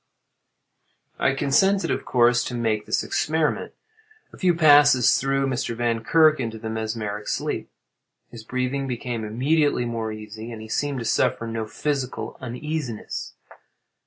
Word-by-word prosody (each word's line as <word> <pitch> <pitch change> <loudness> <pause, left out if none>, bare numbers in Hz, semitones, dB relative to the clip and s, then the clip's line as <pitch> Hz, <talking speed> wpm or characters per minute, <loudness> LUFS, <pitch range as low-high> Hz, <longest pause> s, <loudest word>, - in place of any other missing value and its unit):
I 130 - +2
consented 190 +9 +2
of - - -2
course 120 -1 +3
to 125 - -4
make 110 -3 -1
this - - 0
experiment. 155 -1 -1 0.6
A - - -12
few 180 -2 +3
passes 145 -6 +6
threw 135 0 0
Mr. 125 -3 -2
Vankirk 120 +7 +3
into 115 -3 -3
the 110 0 -5
mesmeric 110 -2 -4
sleep. - - -2 0.6
His 115 -2 -10
breathing 130 +3 -2
became 120 -2 -4
immediately 135 +5 +1
more 115 -2 -3
easy, 110 +2 -8
and 115 - -7
he 110 0 -10
seemed 145 +4 -1
to 115 - -4
suffer 115 - +1
no 115 -1 -4
physical 135 +1 -3
uneasiness. 130 -1 -5
125 Hz, 135 wpm, -24 LUFS, 115-145 Hz, 0.6 s, passes